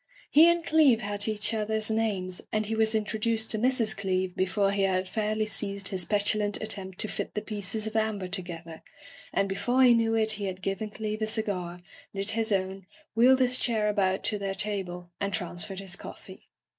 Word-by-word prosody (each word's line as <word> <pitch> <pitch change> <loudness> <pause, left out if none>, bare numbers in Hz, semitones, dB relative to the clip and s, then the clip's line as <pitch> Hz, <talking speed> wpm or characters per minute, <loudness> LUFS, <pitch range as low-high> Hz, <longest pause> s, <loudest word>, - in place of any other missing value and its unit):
He 320 +3 +8
and 340 -1 +1
Cleeve 290 -9 +4
had 205 0 0
each 215 +1 0
other's 220 0 -1
names, 200 -5 -1
and 215 0 0
he 220 - -3
was 220 0 +2
introduced 220 +1 -1
to 220 - -1
Mrs. 240 -2 +2
Cleeve 185 -2 -1
before 195 +1 +1
he 200 0 0
had 185 -1 +1
fairly 215 +2 -1
ceased 200 -2 -2
his 185 -2 -1
petulant 205 +1 +1
attempt 195 -4 -3
to - - -1
fit - - -4
the 210 - -1
pieces 210 0 -3
of 220 0 -5
amber 215 -4 0
together, 170 -3 -5 0.5
and 195 - +1
before 245 +7 +1
he 245 -1 +7
knew 225 -1 +2
it 220 -1 +2
he 210 -2 0
had 185 -1 -5
given 195 +2 -2
Cleeve 215 0 -4
a 215 - 0
cigar, 190 -6 -2 0.3
lit 200 +2 +2
his 225 0 0
own, 190 -1 -1 0.3
wheeled 255 +3 +5
his 250 0 +3
chair 220 -3 +1
about 195 -2 +1
to 210 - +1
their 195 -1 -3
table, 185 -3 -4
and 200 0 -1
transferred 175 +2 -5
his 195 -2 -2
coffee. - - -11
210 Hz, 195 wpm, -28 LUFS, 190-220 Hz, 0.5 s, He